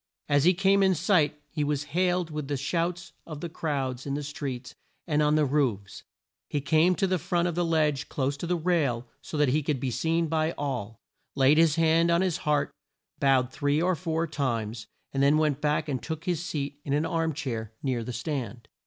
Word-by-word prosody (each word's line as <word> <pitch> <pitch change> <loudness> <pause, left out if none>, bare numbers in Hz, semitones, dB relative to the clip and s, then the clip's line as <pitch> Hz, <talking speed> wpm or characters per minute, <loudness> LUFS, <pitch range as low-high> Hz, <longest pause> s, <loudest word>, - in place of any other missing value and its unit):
As 145 0 +3
he 180 +1 +5
came 195 +2 +3
in 190 -1 +4
sight 155 -4 +2
he 150 -2 -1
was 145 -1 -1
hailed 180 -1 +1
with 150 -2 -4
the 145 -1 -1
shouts 170 +5 -2
of 155 -3 -7
the 170 - -5
crowds 135 -5 -3
in 140 - -1
the 145 - -3
streets 135 -3 -5 0.3
and 150 -3 +1
on 150 0 +3
the 155 -1 +3
roofs. 130 -9 -1 0.5
He 145 - 0
came 155 +6 +3
to 195 - +1
the 185 -1 0
front 175 +2 0
of 175 - -1
the 175 +2 0
ledge 155 -4 +1
close 140 0 -1
to 170 - -5
the 180 - +1
rail, 155 -8 0 0.2
so 150 - -6
that 150 -2 +3
he 150 +4 +2
could 145 -2 -1
be 130 0 -2
seen 165 +6 +1
by 160 +1 0
all, 125 -7 -4 0.4
laid 140 +3 +5
his 165 -3 +4
hand 165 +1 +3
on 170 +1 +3
his 185 -3 +1
heart, 150 -3 0 0.5
bowed 130 -2 +3
three 145 +2 0
or 180 +3 +2
four 165 -1 -1
times, 115 -8 -3 0.3
and 135 - 0
then 140 +2 +5
went 150 -2 +1
back 150 +1 +1
and 135 -4 -2
took 160 0 -5
his 175 -2 -1
seat 145 -3 -4
in 140 - -2
an 150 +2 +1
arm 165 -1 0
chair 115 -7 -4
near 125 -4 -1
the 125 - -5
stand. 120 -4 -4
150 Hz, 215 wpm, -27 LUFS, 135-165 Hz, 0.5 s, he